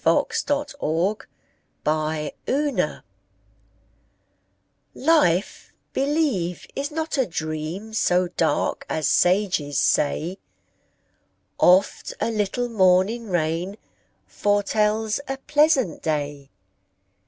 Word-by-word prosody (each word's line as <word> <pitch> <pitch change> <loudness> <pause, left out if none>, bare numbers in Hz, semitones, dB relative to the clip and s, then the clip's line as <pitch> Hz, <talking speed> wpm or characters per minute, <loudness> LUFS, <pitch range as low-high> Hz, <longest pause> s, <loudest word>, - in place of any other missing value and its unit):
Charlotte 290 -11 +1 1.1
Bronte 155 0 -1 0.2
Life 275 - -1 1.9
LIFE, 265 - +1 0.2
believe, 275 - 0
is 280 +1 -2
not 315 -1 -3
a 255 - +2
dream 160 +6 -5
So 180 -4 +2
dark 160 -4 0
as 155 -3 0
sages 180 -6 +2
say; 160 +5 +1 1.2
Oft 185 +3 +3
a 230 - 0
little 215 +3 -1
morning 205 +2 +2
rain 175 +3 -1 0.5
Foretells 210 +2 0
a 270 - -3
pleasant 295 - +2
day. 145 -3 -3
195 Hz, 80 wpm, -23 LUFS, 160-260 Hz, 1.9 s, Oft